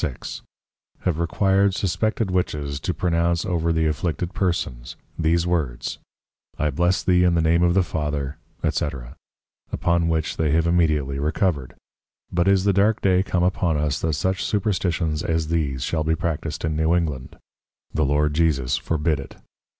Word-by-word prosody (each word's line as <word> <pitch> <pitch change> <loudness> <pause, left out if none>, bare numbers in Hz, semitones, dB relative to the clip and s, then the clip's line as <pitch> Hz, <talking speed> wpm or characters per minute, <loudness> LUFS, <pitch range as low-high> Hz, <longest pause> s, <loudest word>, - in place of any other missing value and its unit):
6._) 70 -8 -4 0.6
have 85 -3 -1
required 95 +3 +2
suspected 110 +2 0
Witches 75 -6 -1
to 85 - -2
pronounce 85 0 0
over 85 -2 0
the 80 -1 +1
afflicted 80 +3 -2
persons, 75 - -2 0.2
these 85 +1 +2
words, 80 -9 -2 0.6
I 75 -1 0
bless 90 +6 +1
thee 90 -1 +4
in 90 -1 +3
the - - +3
Name 85 +2 +3
of 85 0 +3
the 95 - +4
Father, 75 -3 -3 0.3
&c. - - 0 0.8
upon 85 -1 +1
which 80 -1 -1
they 75 -2 +1
have 80 0 +3
immediately 75 -5 +1
recovered; 75 -3 -1 0.6
but 85 +1 +1
is 95 -1 +4
the 100 0 +3
dark 100 +3 +3
day 95 -1 +4
come 90 -2 0
upon 90 -3 +1
us, 75 -1 0
that 80 -1 -1
such 95 +6 -1
Superstitions 90 -6 0
as 80 -1 -1
these 70 -6 -1
shall 80 -2 -1
be 80 +1 +1
practised 85 -1 -3
in 80 -1 -1
New 80 +2 +2
England: 75 -7 -2 0.6
The 80 - +1
Lord 75 +1 +2
Jesus 75 -6 +1
forbid 80 -1 0
it. 70 - -9
80 Hz, 160 wpm, -23 LUFS, 75-90 Hz, 0.8 s, thee